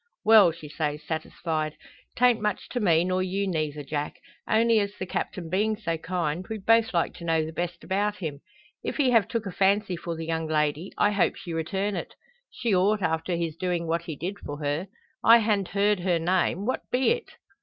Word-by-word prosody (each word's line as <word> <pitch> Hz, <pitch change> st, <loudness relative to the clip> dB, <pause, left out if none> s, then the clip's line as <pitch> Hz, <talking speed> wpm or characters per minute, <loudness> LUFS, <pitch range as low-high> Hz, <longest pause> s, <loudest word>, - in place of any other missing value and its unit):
"Well," 215 Hz, -5 st, +8 dB
she 160 Hz, -2 st, -10 dB
says, 150 Hz, 0 st, -3 dB
satisfied, 155 Hz, 0 st, -3 dB, 0.4 s
"'tan't 245 Hz, -2 st, +4 dB
much 210 Hz, -2 st, -2 dB
to 245 Hz, -, -2 dB
me, 170 Hz, -6 st, +4 dB
nor 185 Hz, 0 st, 0 dB
you 190 Hz, +2 st, -1 dB
neyther, 155 Hz, -5 st, -2 dB
Jack; 145 Hz, +1 st, -3 dB, 0.3 s
only 230 Hz, 0 st, +4 dB
as 200 Hz, 0 st, -2 dB
the 185 Hz, -, -5 dB
Captain 180 Hz, -1 st, -4 dB
being 210 Hz, +6 st, +1 dB
so 170 Hz, -6 st, -2 dB
kind, 170 Hz, 0 st, -2 dB
we'd 220 Hz, -3 st, -6 dB
both 225 Hz, 0 st, +4 dB
like 170 Hz, -2 st, 0 dB
to -, -, -10 dB
know 165 Hz, -1 st, +1 dB
the 160 Hz, -, -7 dB
best 175 Hz, +1 st, -4 dB
about 205 Hz, +2 st, 0 dB
him. 155 Hz, -8 st, -5 dB, 0.4 s
If -, -, -3 dB
he 270 Hz, -4 st, +3 dB
have 225 Hz, -5 st, +4 dB
took 230 Hz, -3 st, -2 dB
a 195 Hz, -, -4 dB
fancy 195 Hz, 0 st, +2 dB
for 170 Hz, 0 st, -5 dB
the 165 Hz, 0 st, -5 dB
young 160 Hz, 0 st, -2 dB
lady, 155 Hz, +2 st, 0 dB
I 205 Hz, -, +3 dB
hope 200 Hz, -3 st, +2 dB
she 170 Hz, -, -7 dB
return 190 Hz, +5 st, -1 dB
it. -, -, -6 dB, 0.3 s
She 230 Hz, -4 st, -1 dB
ought 200 Hz, +2 st, +2 dB
after 160 Hz, +2 st, 0 dB
his 165 Hz, -2 st, -2 dB
doin' 175 Hz, -1 st, -1 dB
what 165 Hz, +1 st, 0 dB
he 160 Hz, -, -5 dB
did 185 Hz, +7 st, -5 dB
for 145 Hz, -, -6 dB
her. 150 Hz, +5 st, -2 dB, 0.4 s
I 230 Hz, +1 st, +9 dB
han't 210 Hz, -4 st, +1 dB
heerd 200 Hz, +1 st, +2 dB
her 175 Hz, -1 st, +1 dB
name; 180 Hz, +2 st, +1 dB
what 255 Hz, -, -1 dB
be 255 Hz, -, +2 dB
it?" 475 Hz, -1 st, -2 dB
180 Hz, 210 wpm, -26 LUFS, 160-205 Hz, 0.4 s, I